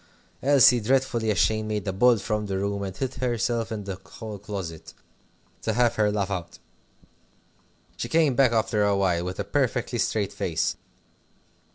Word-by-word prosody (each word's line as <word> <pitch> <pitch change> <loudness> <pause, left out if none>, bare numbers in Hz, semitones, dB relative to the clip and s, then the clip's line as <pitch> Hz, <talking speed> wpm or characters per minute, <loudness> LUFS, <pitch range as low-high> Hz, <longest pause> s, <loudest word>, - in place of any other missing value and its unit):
Elsie, 135 -3 +6
dreadfully 120 -1 +1
ashamed, 110 +1 +1
made 105 -1 -3
a 95 - -1
bolt 115 +2 +4
from 105 0 -2
the 95 -1 -2
room, 100 +1 -2
and 95 -1 -5
hid 130 -1 -2
herself 120 -2 -1
in 105 -2 -4
the 95 -2 -5
hall 110 -3 -8
closet 95 -6 -7 0.7
to 110 - -1
have 120 +1 +3
her 105 -1 +2
laugh 100 -1 -1
out. 85 -3 -5 1.4
She - - -4
came 160 -4 +3
back 125 -1 +4
after 110 -2 +1
a 100 -1 +2
while, 90 -3 +1
with 90 +2 -5
a - - 0
perfectly 125 0 -1
straight 105 -3 0
face. 80 -1 -1
105 Hz, 165 wpm, -25 LUFS, 100-120 Hz, 1.4 s, Elsie